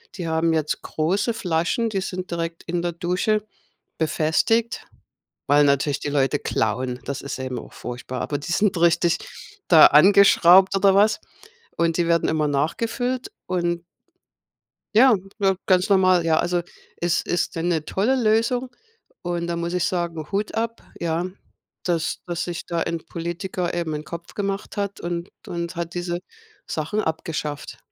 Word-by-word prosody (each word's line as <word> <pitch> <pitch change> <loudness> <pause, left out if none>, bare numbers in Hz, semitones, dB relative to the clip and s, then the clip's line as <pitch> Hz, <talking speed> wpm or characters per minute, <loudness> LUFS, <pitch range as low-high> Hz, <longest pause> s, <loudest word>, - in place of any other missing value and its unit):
die 175 -4 -4
haben 160 +1 +1
jetzt 155 -1 -1
große 190 +9 0
Flaschen, 185 +3 0
die 195 -3 -2
sind 185 -1 -5
direkt 165 0 -4
in 175 0 -2
der 175 0 -2
Dusche 180 +5 0 0.5
befestigt, 165 +9 +1 0.6
weil 145 +1 +5
natürlich 140 0 +1
die 145 - -3
Leute 140 0 +1
klauen. 125 +3 -1
Das 140 -1 -4
ist 140 - -5
eben 130 -1 -4
auch - - -11
furchtbar, 125 +1 -6
aber 145 - -2
die 160 +5 -5
sind 200 -1 +2
richtig 170 0 +3 0.5
da 160 -3 +9
angeschraubt 190 +2 +6
oder 195 0 +4
was. 210 +2 +4 0.6
Und 165 -1 +2
die 170 -1 +1
werden 170 -1 +2
immer 155 -2 +1
nachgefüllt 230 - -1
und 175 -1 -1 1.1
Ja, 255 +1 +7 0.2
na, 195 -1 +3
ganz 185 +1 +3
normal. 185 -3 +4
Ja, 160 -1 +3
also 175 0 +1 0.4
es 175 0 +1
ist 175 - -1
'ne 165 -1 0
tolle 220 +8 +1
Lösung. 245 +2 +1 0.5
Und 170 -1 -2
da 170 - -2
muss 170 +1 -3
ich 180 - 0
sagen, 170 -4 -2
Hut 205 +2 -2
ab, 230 0 -2 0.2
ja, 170 +1 -1 0.6
dass 170 -3 -1
dass 175 -1 -3
sich 175 -2 -5
da 170 -1 -2
ein 170 0 -2
Politiker 175 +1 -4
eben 170 -2 -2
'n 150 0 -4
Kopf 170 +1 -8
gemacht 200 +1 -4
hat 200 -1 -3
und 170 0 -4 0.2
und 170 +1 -4
hat 170 0 -4
diese 175 0 -3 0.5
Sachen 165 +8 -2
abgeschafft. 155 -2 -4
170 Hz, 155 wpm, -23 LUFS, 160-195 Hz, 1.1 s, da